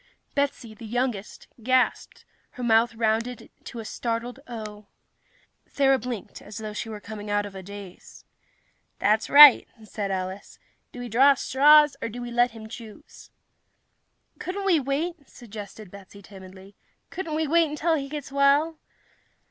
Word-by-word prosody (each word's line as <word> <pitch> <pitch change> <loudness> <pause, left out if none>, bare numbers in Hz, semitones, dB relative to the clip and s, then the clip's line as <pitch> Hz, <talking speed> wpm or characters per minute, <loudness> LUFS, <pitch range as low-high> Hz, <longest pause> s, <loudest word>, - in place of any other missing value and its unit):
Betsy, 280 -5 -2
the 220 +1 -11
youngest, 240 -3 -3
gasped, 255 +2 0
and - - -36
her 250 - -5
mouth 230 0 +3
rounded 225 +2 -2
to - - -9
a 225 - -6
startled 235 +3 -4
O. 215 -3 -8 0.8
Thera 270 -1 +2
blinked, 240 -3 -7
as 205 0 -10
though 215 -1 -6
she 225 +2 -5
were 215 -1 -7
coming 210 0 -9
out 205 0 0
of 200 - -9
a 190 - -8
daze. 200 -1 -12 0.7
"That's 215 +2 +1
right," 290 -2 +9 0.2
said 210 -1 -5
Alice. 190 +1 -5 0.3
"Do 245 - -9
we 245 - -5
draw 270 +5 +5
straws, 295 +3 +5
or 230 - -3
do 240 +3 -8
we 240 0 -6
let 240 +1 +3
him 220 -2 -11
choose?" 220 -1 -12 1.1
"Couldn't 390 +2 -5
we 355 -5 +4
wait?" 285 +3 -3
suggested 215 -3 -11
Betsy 200 0 -14
timidly. 190 0 -14 0.4
"Couldn't 335 -4 -4
we 315 0 0
wait 330 +1 +3
until 305 +3 0
he 275 -3 -2
gets 290 -2 -7
well?" 280 +3 +2
235 Hz, 155 wpm, -25 LUFS, 210-280 Hz, 1.1 s, right